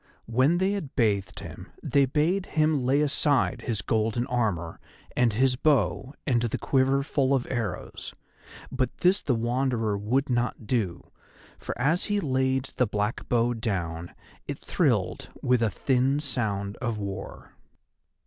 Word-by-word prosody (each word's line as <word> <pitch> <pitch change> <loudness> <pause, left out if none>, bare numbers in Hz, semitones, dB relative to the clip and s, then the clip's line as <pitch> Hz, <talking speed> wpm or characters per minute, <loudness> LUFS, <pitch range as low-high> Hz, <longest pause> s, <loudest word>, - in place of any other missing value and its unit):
When 130 +9 +3
they 190 +2 +2
had 195 -9 -4
bathed 100 - 0
him - - -9 0.2
they 140 -1 +3
bade 170 +8 +1
him 155 -2 +2
lay 135 +4 +3
aside 140 -4 +2
his 115 -3 -2
golden 115 +2 0
armour 105 -10 -1 0.4
and 120 -2 +3
his 125 +4 +2
bow 135 0 +1
and 125 -5 +2
the 120 -2 -1
quiver 135 0 +2
full 135 -1 +1
of 125 - -1
arrows, 120 -4 -4 0.6
but 130 - -1
this 185 +2 +3
the 130 - +1
Wanderer 120 -2 0
would 120 +8 0
not 120 -2 -1
do, 100 -7 -2 0.5
for - - -5
as 150 +8 +2
he 205 -1 0
laid 130 -4 +1
the 125 - +3
black 105 +2 -2
bow 120 0 +2
down 90 -7 -3 0.3
it - - -4
thrilled - - 0
with 125 -1 +3
a 115 - +3
thin 130 +6 +1
sound 105 -8 -2
of 120 -3 -2
war. 100 -2 -6
125 Hz, 150 wpm, -27 LUFS, 110-135 Hz, 0.6 s, When